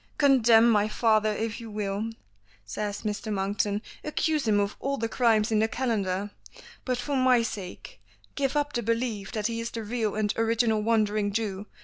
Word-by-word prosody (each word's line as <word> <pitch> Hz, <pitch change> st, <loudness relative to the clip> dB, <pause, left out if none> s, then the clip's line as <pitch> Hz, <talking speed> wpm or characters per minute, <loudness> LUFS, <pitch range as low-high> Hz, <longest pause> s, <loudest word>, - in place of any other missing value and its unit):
"Condemn 240 Hz, -6 st, +5 dB
my 210 Hz, -2 st, +3 dB
father 215 Hz, -1 st, +2 dB
if 220 Hz, +2 st, -3 dB
you 230 Hz, -, -8 dB
will," 205 Hz, +1 st, -3 dB, 0.6 s
says 205 Hz, -, -4 dB
Mr. 210 Hz, 0 st, -3 dB
Monkton, 205 Hz, +1 st, -1 dB, 0.2 s
"accuse 305 Hz, -2 st, 0 dB
him 210 Hz, -1 st, +3 dB
of 200 Hz, 0 st, -1 dB
all 275 Hz, +1 st, -2 dB
the 230 Hz, -, -1 dB
crimes 225 Hz, -2 st, +2 dB
in 215 Hz, -, +3 dB
the 220 Hz, -, +3 dB
calendar, 205 Hz, -5 st, -1 dB, 0.5 s
but 255 Hz, -2 st, 0 dB
for 280 Hz, +3 st, -3 dB
my 255 Hz, -2 st, +4 dB
sake 210 Hz, -, -7 dB, 0.3 s
give 280 Hz, 0 st, -1 dB
up 290 Hz, 0 st, 0 dB
the 240 Hz, -, 0 dB
belief 230 Hz, -3 st, -2 dB
that 215 Hz, -2 st, -3 dB
he 230 Hz, 0 st, -1 dB
is 230 Hz, 0 st, -3 dB
the 230 Hz, -1 st, -5 dB
real 220 Hz, -1 st, -2 dB
and 210 Hz, -1 st, 0 dB
original 225 Hz, -1 st, +2 dB
Wandering 215 Hz, -2 st, +1 dB
Jew. 205 Hz, -1 st, -3 dB
220 Hz, 175 wpm, -27 LUFS, 210-235 Hz, 0.6 s, Condemn